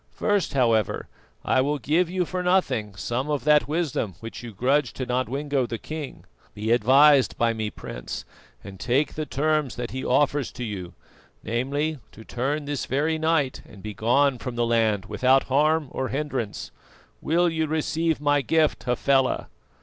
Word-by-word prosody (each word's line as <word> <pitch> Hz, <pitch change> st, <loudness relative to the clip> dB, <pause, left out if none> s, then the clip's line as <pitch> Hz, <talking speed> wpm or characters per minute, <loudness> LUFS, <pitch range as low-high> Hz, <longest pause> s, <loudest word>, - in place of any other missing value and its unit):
First, 205 Hz, -8 st, 0 dB
however, 115 Hz, -6 st, +1 dB, 0.4 s
I 130 Hz, -, +3 dB
will 145 Hz, +3 st, 0 dB
give 160 Hz, +7 st, +1 dB
you 180 Hz, 0 st, 0 dB
for 180 Hz, +2 st, -3 dB
nothing 180 Hz, -, +1 dB
some 125 Hz, +8 st, -3 dB
of 145 Hz, -2 st, -1 dB
that 150 Hz, 0 st, +4 dB
wisdom 150 Hz, -, -2 dB
which 115 Hz, 0 st, -8 dB
you 120 Hz, -1 st, -8 dB
grudge 130 Hz, +5 st, +1 dB
to 130 Hz, -, -4 dB
Nodwengo 130 Hz, +2 st, -1 dB
the 115 Hz, -, -4 dB
king. 155 Hz, +2 st, -7 dB, 0.3 s
Be 110 Hz, +2 st, -2 dB
advised 135 Hz, +4 st, +5 dB
by 115 Hz, -1 st, +2 dB
me, 110 Hz, -1 st, -3 dB
Prince, -, -, -7 dB, 0.4 s
and 95 Hz, -1 st, -10 dB
take 130 Hz, +8 st, +1 dB
the 155 Hz, -1 st, -4 dB
terms 150 Hz, -2 st, 0 dB
that 120 Hz, -1 st, -5 dB
he 130 Hz, +1 st, -4 dB
offers 140 Hz, +1 st, +1 dB
to 125 Hz, -, -6 dB
you 95 Hz, -6 st, -6 dB, 0.5 s
namely, 140 Hz, +7 st, -1 dB
to 110 Hz, -, -12 dB
turn 140 Hz, +5 st, -2 dB
this 145 Hz, -1 st, -3 dB
very 155 Hz, +4 st, 0 dB
night 160 Hz, -4 st, +1 dB
and 100 Hz, -4 st, -15 dB
begone 120 Hz, +6 st, +1 dB
from 125 Hz, -1 st, -5 dB
the 120 Hz, 0 st, +1 dB
land 110 Hz, -4 st, +1 dB
without 130 Hz, +6 st, +3 dB
harm 150 Hz, +3 st, +2 dB
or 130 Hz, -, -2 dB
hindrance. 135 Hz, -7 st, -3 dB, 0.5 s
Will 175 Hz, +3 st, +2 dB
you 160 Hz, -1 st, 0 dB
receive 160 Hz, +1 st, 0 dB
my 145 Hz, 0 st, +2 dB
gift, 155 Hz, +4 st, +1 dB
Hafela?" 130 Hz, +2 st, +1 dB
135 Hz, 165 wpm, -25 LUFS, 120-150 Hz, 0.5 s, advised